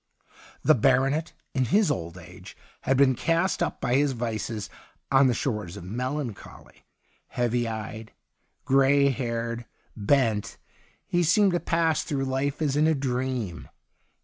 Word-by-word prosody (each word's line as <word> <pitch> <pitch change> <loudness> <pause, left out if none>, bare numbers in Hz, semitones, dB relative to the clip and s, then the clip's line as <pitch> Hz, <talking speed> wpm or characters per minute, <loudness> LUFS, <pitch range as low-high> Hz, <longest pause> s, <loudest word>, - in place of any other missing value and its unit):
The - - +6
baronet, 135 +5 +2 0.2
in 130 -1 +1
his 200 - +3
old 85 0 -4
age, 90 0 -12 0.2
had 135 - +1
been 135 -1 +5
cast 165 +9 0
up 170 - -1
by 125 -2 -1
his 140 +1 +3
vices 115 -2 -3 0.4
on 135 0 +6
the 125 - +1
shores 105 -7 -3
of 100 - -8
melancholy; 125 +4 -6 0.4
heavy 120 -1 0
eyed, 110 0 -6 0.5
gray 135 +1 +4
haired, 115 -2 -3 0.3
bent, 110 -1 +1 0.5
he 175 - +1
seemed 195 +4 +4
to 175 - +1
pass 165 -3 +1
through 135 -2 -2
life 135 +3 -1
as 140 -2 0
in 150 +2 +3
a 160 - +3
dream. 125 -7 -3
130 Hz, 140 wpm, -26 LUFS, 115-145 Hz, 0.5 s, The